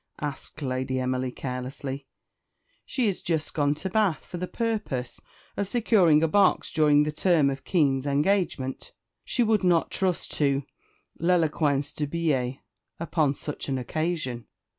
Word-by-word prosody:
asked 145 +1 -6
Lady 130 0 -1
Emily 130 0 -1
carelessly. 135 +2 -5 0.8
"She 250 -4 0
is 195 - -1
just 160 -3 -2
gone 145 -1 +1
to 185 - -5
Bath 205 -5 +1
for 180 - -7
the 180 +1 -3
purpose 205 - -3 0.3
of 200 - -1
securing 190 -9 +4
a - - +4
box 195 +4 +3
during 150 -2 +4
the 150 - -1
term 155 -3 +3
of 135 0 -6
Kean's 140 -6 +1
engagement; 145 -2 0 0.3
she 245 - +1
would 215 -2 +2
not 175 -2 +3
trust 185 -3 0
to 140 -1 +2 0.6
l'éloquence 155 -5 +2
du 150 - -2
billet 140 -5 0 0.4
upon 155 -4 +1
such 150 0 -5
an 135 - 0
occasion." 130 -3 -3
150 Hz, 140 wpm, -26 LUFS, 135-175 Hz, 0.8 s, securing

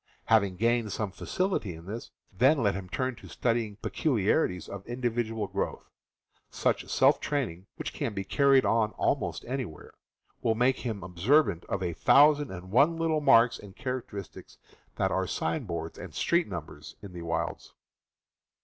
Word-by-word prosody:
Having 100 -4 +3
gained 115 +1 +1
some 105 -1 -2
facility 185 - -2
in 80 +1 -12
this, 110 +5 -6 0.2
then 135 +8 +4
let 100 -2 +3
him 95 -1 -6
turn 130 +3 -2
to - - -12
studying 115 -3 -1
peculiarities 105 - 0
of 100 -1 -7
individual 120 -2 -2
growth. - - -4 0.6
Such - - -1
self - - +4
training, 105 - -3
which - - -5
can 105 - -3
be 95 - -2
carried 135 +5 +4
out 110 -2 +1
almost - - -1
anywhere, 125 - -5 0.5
will 115 - +1
make 125 +3 +2
him 110 -6 -4
observant 95 - +2
of 95 -1 -3
a 85 -2 -1
thousand 145 - +5
and 95 0 -8
one 145 +9 +4
little 160 -2 +1
marks 120 -4 +5
and 100 -2 -12
characteristics 125 - -6 0.4
that - - 0
are - - 0
sign 80 +8 -2
boards 85 -3 -5
and - - -9
street - - +2
numbers - - -8
in 100 -3 -9
the 85 - -7
wilds. 85 0 -3
110 Hz, 160 wpm, -29 LUFS, 95-130 Hz, 0.6 s, thousand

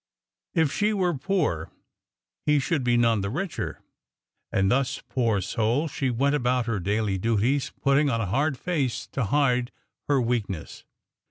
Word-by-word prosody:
If 160 -4 +3
she 210 +1 +1
were 185 -4 +1
poor, 145 - -1 0.8
he 150 0 +5
should 145 0 0
be 120 -1 +3
none 115 -3 +3
the 100 - -2
richer. 175 - -4 0.7
And 95 0 +2
thus, 135 +1 0
poor 115 -6 +1
soul, 115 - 0
she 135 -3 -2
went 135 +4 +1
about 125 -3 +1
her 115 -4 -1
daily 100 +1 0
duties, 115 +6 +1
putting 140 +1 +4
on 115 -3 0
a 115 - 0
hard 135 - 0
face 145 -8 -1
to 125 - -1
hide 125 0 +2 0.4
her 145 -2 +3
weakness. 115 -8 -3
125 Hz, 155 wpm, -26 LUFS, 110-145 Hz, 0.8 s, he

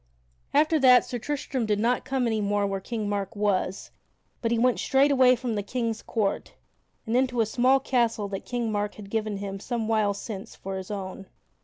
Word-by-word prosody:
After 310 +2 +3
that 250 -2 +6
Sir 245 -1 -4
Tristram 260 -2 -3
did 210 -1 +2
not 235 +3 +1
come 265 -2 0
any 220 -2 0
more 205 0 +1
where 195 -1 -2
King 215 +1 -4
Mark 200 -1 -3
was, 200 -2 -1 0.5
but 230 - 0
he 235 - +2
went 245 +1 +2
straight 275 +1 +3
away 255 -2 +6
from 245 -1 -3
the 205 - -1
King's 230 +1 -3
court 210 -4 -2 0.5
and 225 - -1
into 250 -1 +1
a 225 - +4
small 255 +5 +3
castle 235 -5 0
that 195 -1 -5
King 240 -2 -2
Mark 205 0 -2
had 200 -2 -11
given 215 -2 -1
him 195 0 -5
some 230 +1 -3
while 215 -2 +2
since 200 +1 -7
for 195 0 -6
his 190 -1 -7
own. 195 -1 -6
225 Hz, 200 wpm, -26 LUFS, 205-250 Hz, 0.5 s, that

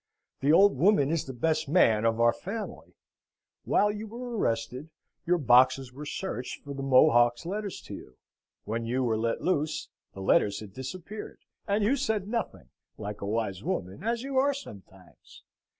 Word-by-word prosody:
The 140 +2 +2
old 195 -1 +5
woman 155 -3 +4
is 165 -2 0
the 135 - -6
best 155 +3 0
man 115 -10 +4
of 115 0 +1
our 115 0 +5
family. 210 +3 -7 0.7
While 210 0 +3
you 210 +1 -6
were 240 +2 -6
arrested, 125 - -2 0.4
your 180 +1 +3
boxes 130 -2 +4
were 145 +3 -8
searched 135 -10 -5
for 140 - -7
the 135 - -6
Mohock's 120 -1 +4
letters 200 +2 -4
to - - -10
you. 65 - -11 0.5
When 115 +2 -3
you 125 +3 -1
were 115 -3 +1
let 115 +1 -1
loose, 155 -4 -1 0.2
the 95 - -8
letters 100 +1 +2
had 105 -3 -10
disappeared, 180 - -8 0.3
and 205 +1 +1
you 235 +7 +3
said 220 -7 -1
nothing, 230 +1 -4 0.3
like 105 0 -6
a 100 - -4
wise 105 -3 -2
woman, 95 - -4
as 230 +2 -1
you 270 -1 0
are 280 +1 +2
sometimes. 95 - -13
140 Hz, 170 wpm, -28 LUFS, -, 0.7 s, old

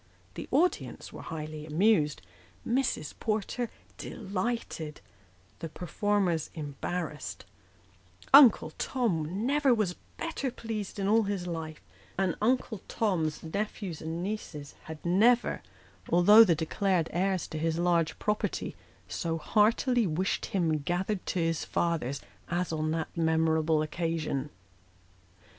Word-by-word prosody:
The - - -7
audience 360 +2 0
were - - -8
highly 155 -1 -6
amused, 155 -1 +2 0.4
Mrs. 245 - 0
Porter 220 +2 -1 0.3
delighted, 195 -6 -4 0.6
the 165 - -5
performers 180 0 0
embarrassed; 150 - -4 0.9
Uncle 255 - +8
Tom 195 -5 -1
never 280 -1 +3
was 205 -5 0 0.2
better 325 -5 -2
pleased 225 -5 -5
in 195 -1 -1
all 220 +2 +5
his 195 -3 -2
life; 160 -3 -5 0.4
and 190 -2 +1
Uncle 225 -3 +1
Tom's 165 -8 -1
nephews 195 0 -4
and 165 +2 -4
nieces 175 -8 -5
had 160 0 -9
never, 225 +8 +3 0.5
although 205 +6 +8
the 175 -7 +3
declared 170 +2 0
heirs 185 +1 +1
to 155 - -4
his 165 +1 0
large 170 -2 +1
property, 210 0 -2 0.3
so 165 -2 -2
heartily 220 - +3
wished 180 +4 -1
him 165 -5 +1
gathered 180 +6 -1
to - - -1
his 165 -1 0
fathers 155 -6 -1 0.3
as 175 0 -1
on 155 0 -1
that 160 0 -3
memorable 160 -1 +2
occasion. 155 -3 -2
175 Hz, 115 wpm, -29 LUFS, 160-210 Hz, 0.9 s, Uncle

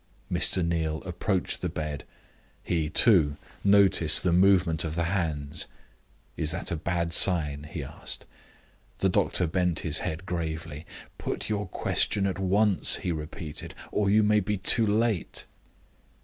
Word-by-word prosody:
Mr. 90 -3 +1
Neal 80 -2 -2
approached 90 0 -2
the - - -2
bed. 75 -2 -5 0.6
He, 80 -3 -1
too, 80 -6 +4 0.3
noticed 95 -5 +4
the 90 -2 +2
movement 90 -3 +3
of 80 -1 -4
the 85 - 0
hands. 80 -5 -1 0.7
"Is 75 - 0
that - - -5
a - - 0
bad 85 +1 -2
sign?" 75 -6 +2
he - - -5
asked. - - -4 0.7
The - - +1
doctor 90 - +2
bent 90 0 0
his 80 0 0
head 80 +4 -5
gravely. 80 -3 -5 0.3
"Put - - -4
your 105 -2 -2
question 100 +2 +1
at 95 -1 -2
once," 100 +1 +2
he 90 - -3
repeated, 75 0 -7 0.2
"or 100 -2 0
you 105 +2 +4
may 105 0 +3
be 105 +1 -2
too 110 +4 +4
late." 110 -3 0
85 Hz, 145 wpm, -27 LUFS, 80-100 Hz, 0.7 s, too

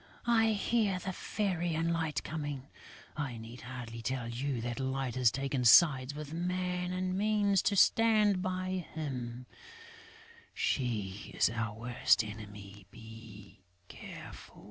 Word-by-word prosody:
I 225 -2 +4
hear 210 -2 +1
the 190 +1 -4
Fairy 175 -5 -1
and 165 +1 +1
Light 160 -3 -1
coming. 145 -4 -5 0.5
I 135 -6 -3
need 115 +2 -10
hardly 120 -2 -7
tell 125 0 -2
you 125 +2 -2
that 120 +2 -4
Light 130 -1 -2
has 125 -1 +4
taken 135 +1 -2
sides 130 +2 +6
with 150 0 -7
Man 180 +1 -2
and 185 0 -1
means 205 -1 +2
to 205 - +1
stand 210 -1 +4
by 185 -1 -2
him; 125 -5 -4 1.1
she 105 -7 -2
is - - +4
our 115 -2 -3
worst 120 0 +2
enemy.... 105 -2 -10
Be 110 -3 -12 0.3
careful!" - - -10
140 Hz, 130 wpm, -32 LUFS, 115-185 Hz, 1.1 s, sides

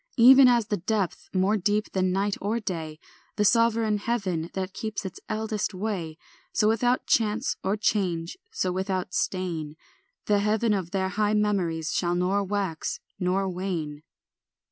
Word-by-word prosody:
Even 260 +2 +9
as 240 -3 +4
the 205 - +1
depth 200 0 -2
more 190 +3 +2
deep 210 +2 0
than 185 -1 +1
night 195 +2 0
or 215 +4 0
day, 160 -7 -4 0.4
The 210 - +1
sovereign 225 -1 +3
heaven 190 -8 -2
that 190 0 -3
keeps 215 0 -4
its 190 - -6
eldest 215 -2 -2
way, 185 -6 -3 0.4
So 210 - +3
without 245 +3 +2
chance 225 +2 +1
or 195 +3 0
change, 180 -6 0 0.2
so 185 - -1
without 185 0 -2
stain, 165 -5 -2 0.5
The 205 -1 +3
heaven 215 +2 +2
of 190 -4 -2
their 190 0 -1
high 210 +2 +1
memories 180 -7 0
shall 175 -1 +1
nor 185 +3 +1
wax 195 -5 -2 0.2
nor 190 +1 +1
wane. 175 -5 -4
195 Hz, 150 wpm, -26 LUFS, 180-215 Hz, 0.5 s, Even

